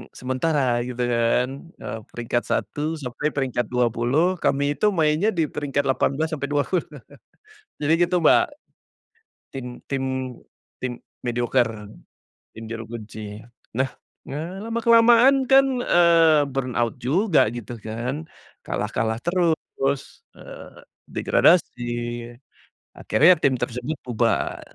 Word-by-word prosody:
sementara, 130 -1 0
gitu 125 0 -3
kan, 120 +5 0
eee, 110 - -6
peringkat 120 0 -3
1 155 +2 -2
sampai 140 0 -3
peringkat 125 -4 -1
20 125 +9 +1
kami 140 +1 +1
itu 210 - +3
mainnya 155 +5 +2
di 170 -7 +1
peringkat 145 -1 -1
18-20. 145 +4 0 1.0
Jadi 150 +2 +2
gitu, 180 -1 0
Mbak. - - +6 1.1
Tim 135 -2 -6 0.2
tim 135 -1 -2 0.8
tim 125 -1 -3 0.3
medioker, 120 0 +1 0.9
tim 115 - -8
juru 115 0 -5
kunci. 110 -1 -8 0.3
Nah, 130 +1 +1 0.3
nga 145 - -5 0.2
lama-kelamaan 235 +3 +5
kan, 270 +1 +6 0.2
eee, 165 -3 +5
burnout 125 -4 -1
juga, 155 - +2
gitu 120 0 -7
kan, 125 +8 -4 0.4
kalah-kalah 110 +1 -2
terus, 160 -5 -1
eee, - - -12 0.2
degradasi, 165 -8 +2 1.2
akhirnya 170 +5 +5
tim 135 -4 +2
tersebut 125 +5 -3
bubar, 115 -2 0
135 Hz, 100 wpm, -23 LUFS, 120-165 Hz, 1.2 s, Mbak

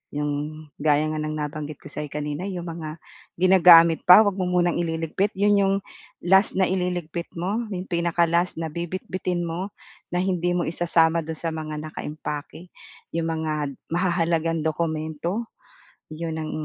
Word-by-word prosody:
'yong 150 +1 -3 0.2
gaya 150 0 +3
nga 155 - -3
ng 155 0 -3
nabanggit 150 0 -4
ko - - -26
sa'yo 150 - -5
kanina 150 +5 -4
'yong 180 -3 -4
mga 165 -2 -6 0.4
ginagamit 170 -3 +7
pa 195 +5 +10
'wag 205 - +2
mo 185 - 0
munang 175 -1 +1
ililigpit, 165 +4 -1
'yon 205 0 +4
'yong 195 0 +3 0.5
last 190 +3 +4
na 190 - +4
ililigpit 175 -2 -2
mo, 205 +7 -2
'yong 185 -1 -4
pinaka-last 170 0 +1
na 160 -2 -3
bibitbitin 180 +1 -3
mo, 175 +4 -4 0.4
na 175 - -2
hindi 175 -2 0
mo 175 - +1
isasama 165 0 +2
do'n 160 0 -6
sa 165 - -3
mga 155 -1 -5
nakaimpake. 155 +2 -6 0.4
'Yong 165 0 -1
mga 160 -1 -1 0.4
mahahalagang 165 -2 +1
dokumento, 160 +5 -2 0.7
'yon 160 0 -4
ang 155 - -4
170 Hz, 150 wpm, -24 LUFS, 155-180 Hz, 0.7 s, pa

